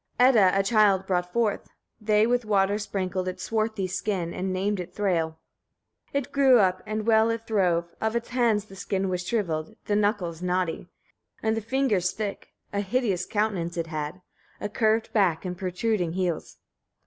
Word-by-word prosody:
7. 255 +1 +6
Edda 195 -2 +5
a - - +3
child 200 -2 +3
brought 180 -2 -1
forth: 230 -2 0 0.3
they 210 0 +3
with 245 +1 +1
water 205 -1 +2
sprinkled 185 -3 -2
its 185 - -4
swarthy 220 -3 -1
skin, 185 -2 -2
and 190 +1 -2
named 195 +2 -1
it 180 0 -7
Thræl. 170 -6 0 0.8
8. - - +4
It - - -24
grew 270 -3 +5
up, 185 -3 +2
and 215 0 -2
well 225 0 +4
it 230 0 -2
throve; 180 -6 +1 0.2
of 220 +1 0
its 235 - -2
hands 235 -4 +2
the 195 - -13
skin 195 0 -2
was 180 -1 -2
shriveled, 165 -9 -2
the 205 - 0
knuckles 205 -5 0
knotty, 180 -2 -1 0.6
and 220 0 +2
the 225 - -2
fingers 220 -6 +1
thick; 210 -2 -4 0.3
a 200 - 0
hideous 205 -3 0
countenance 200 -6 -1
it 165 - -1
had, 155 +2 -5 0.4
a 205 - -3
curved 220 0 +1
back, 190 -6 +2
and 180 -1 -3
protruding 185 -1 -1
heels. 180 -3 -2
200 Hz, 175 wpm, -26 LUFS, 180-220 Hz, 0.8 s, 7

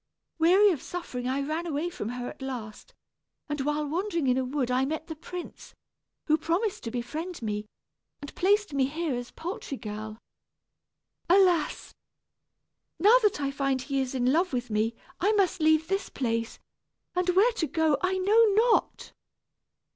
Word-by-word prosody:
Weary 380 +5 +6
of 310 - -3
suffering 260 -9 -5
I 270 +2 0
ran 315 +4 -3
away 320 +3 -2
from 345 - -5
her 245 0 -4
at - - -9
last; 255 - -7 0.5
and 295 -2 -3
while 295 +2 -1
wandering 340 0 -1
in 250 -1 +3
a - - 0
wood 255 -1 -2
I 255 +1 +2
met 310 +3 -3
the 320 - -7
prince, 350 +3 -9 0.5
who 310 0 +3
promised 360 +7 -1
to - - -2
befriend 275 +7 -5
me, 210 -1 -3 0.5
and 285 - -9
placed 410 -2 +2
me 270 -2 +2
here 315 +1 -2
as 245 0 -4
poultry 355 - -6
girl. 215 0 -6 1.1
Alas! 360 -4 +3 1.0
now 430 +8 +6
that 420 -8 +2
I 275 -1 -1
find 275 -1 0
he 270 +1 -1
is 265 0 -3
in 255 +1 +2
love 345 0 +1
with 245 -2 -2
me, 220 +2 0 0.2
I 405 +4 +2
must 375 -4 +1
leave 315 0 +4
this 390 +2 -1
place, 230 -3 -2 0.6
and 360 0 0
where 430 +6 +5
to 360 -9 -2
go 320 -3 +2
I 370 +1 +1
know 415 +5 +5
not." 455 +2 +2
310 Hz, 165 wpm, -28 LUFS, 255-360 Hz, 1.1 s, Weary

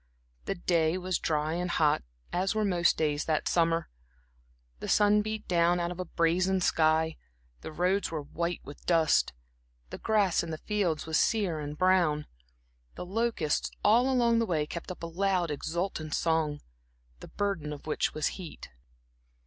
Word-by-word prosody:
The 195 - -2
day 170 -1 +1
was 185 -1 -2
dry 155 0 0
and 180 +1 -2
hot, 155 -3 +2 0.3
as 190 +4 0
were 215 -1 +1
most 175 -3 +2
days 150 -2 0
that 155 -2 0
summer. 165 -1 +2 0.9
The - - -6
sun 210 0 +4
beat 215 0 -5
down 175 0 +3
out 170 0 -1
of 180 - -8
a 185 - -2
brazen 180 +3 +1
sky, 160 -1 +2 0.4
the - - -8
roads 185 +5 +1
were 155 -3 -4
white 170 +4 -3
with 145 - -11
dust, 165 -3 +3 0.6
the - - -7
grass 205 -5 +2
in 170 - -6
the 160 - -4
fields 185 -4 -1
was 160 -1 +1
sere 200 -8 +1
and 150 0 -6
brown. 175 -5 +3 0.7
The - - -6
locusts 205 -6 0
all 240 +5 +4
along 235 -2 +3
the 230 - 0
way 155 -5 0
kept 170 +4 -7
up 180 - -9
a - - -1
loud, 180 0 0
exultant 160 +1 -3
song, 160 -3 0 0.6
the - - -10
burden 195 -7 -2
of 145 - -8
which 155 - 0
was 155 - -1
heat. 175 -4 -9
170 Hz, 165 wpm, -29 LUFS, 155-190 Hz, 0.9 s, sun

